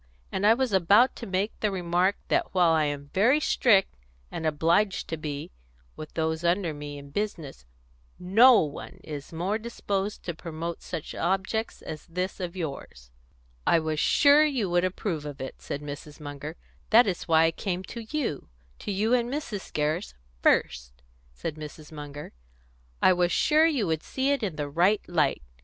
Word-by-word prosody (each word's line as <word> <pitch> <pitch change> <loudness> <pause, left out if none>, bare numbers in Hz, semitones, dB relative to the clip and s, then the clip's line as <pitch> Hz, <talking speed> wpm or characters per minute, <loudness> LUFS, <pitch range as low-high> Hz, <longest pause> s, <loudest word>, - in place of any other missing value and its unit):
And 195 +2 +1
I 225 - +7
was 255 -3 -1
about 200 +7 +5
to 235 - -7
make 195 +3 -1
the 215 - +1
remark 180 +1 +1
that - - 0
while 175 -3 +5
I 160 -1 +3
am 145 -1 -4
very 240 +10 +4
strict 215 -9 +3 0.4
and 160 - -3
obliged 165 +6 +1
to 160 - -1
be 150 -2 -5 0.4
with 155 - -9
those 160 0 -1
under 170 -1 +1
me 145 0 -7
in 140 0 -11
business, 165 - -4 0.5
no 225 +7 +6
one 150 -2 -6
is 145 -2 -7
more 185 +6 -1
disposed 205 -3 -3
to 170 - -3
promote 165 0 -6
such 165 -4 -6
objects 195 +5 -2
as 155 -1 -8
this 180 +4 -3
of 180 -1 -4
yours." 135 - -7 0.6
"I - - +5
was 155 -1 -1
sure 290 - +5
you 255 - 0
would 175 0 +3
approve 185 -3 -2
of 145 -2 -7
it," 130 - -7
said 145 - -5
Mrs. 145 +1 -8
Munger. 145 +1 -7 0.3
"That 230 +3 +7
is 190 -4 -3
why 160 -1 +5
I 165 - +3
came 185 +1 -3
to 235 - -8
you 265 - -3 0.3
to - - -4
you 210 +5 +1
and 240 -1 +2
Mrs. 255 -9 -5
Gerrish 150 - -1 0.3
first," - - +2 0.4
said 70 - -6
Mrs. 155 0 -9
Munger. 145 -1 -8 0.7
"I 185 - +7
was 175 0 +1
sure 310 - +4
you 275 -10 0
would 160 -2 -1
see 270 +1 -1
it 280 -2 0
in 195 -7 -2
the 145 -1 -3
right 175 +8 +2
light." 165 - +1
175 Hz, 175 wpm, -27 LUFS, 150-205 Hz, 0.7 s, I